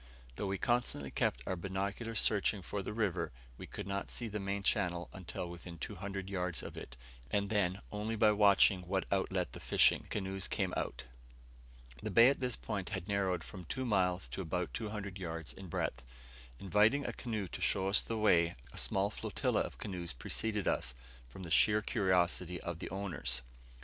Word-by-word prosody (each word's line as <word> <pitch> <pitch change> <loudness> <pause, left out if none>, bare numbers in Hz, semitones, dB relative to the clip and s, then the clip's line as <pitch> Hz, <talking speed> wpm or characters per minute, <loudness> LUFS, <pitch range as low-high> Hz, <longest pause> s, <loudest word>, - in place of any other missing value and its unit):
Though 100 - -2
we 95 0 -1
constantly 120 - 0
kept - - 0
our 95 - -1
binocular 100 +5 -3
searching 105 -2 +2
for 100 - -3
the 95 - -4
river, 100 -6 0 0.3
we - - -7
could - - -6
not 100 0 -3
see 120 - -3
the 105 -1 -3
main 100 0 -2
channel 90 -4 +1
until 90 -1 -5
within 85 0 -8
200 95 +1 -5
yards 90 -3 -2
of - - -7
it, - - -8 0.3
and 100 0 0
then 100 -2 +1
only 105 +2 -2
by 110 0 +5
watching 100 -2 +6
by 90 - -13
what 95 +1 0
outlet - - 0
the - - -7
fishing; - - +4
canoes 95 -1 -2
came - - -1
out. - - -2 1.0
The - - -3
bay 115 +2 +8
at 140 - 0
this 125 -2 0
point 100 -5 -4
had 85 - -4
narrowed 95 -4 +1
from 90 -3 -9
two 130 +10 -3
miles 95 -5 +2
to - - -4
about 90 0 -2
200 105 -3 -4
yards 80 -3 -5
in 95 - -9
breadth. 60 -6 -2 0.6
Inviting 105 +8 +3
a - - -2
canoe 110 -5 -3
to - - -7
show 95 0 +2
us 100 - +3
the 115 - -3
way, 85 -6 +4 0.2
a - - -2
small 100 +1 +2
flotilla - - 0
of - - -4
canoes 90 -5 -4
preceded 105 - -1
us, 65 - +1 0.3
from 95 +10 -9
the 85 - -7
sheer 105 +5 +5
curiosity 90 -4 +1
of 85 -1 -4
their - - -5
owners. 95 -9 -2
95 Hz, 185 wpm, -34 LUFS, 90-105 Hz, 1.0 s, bay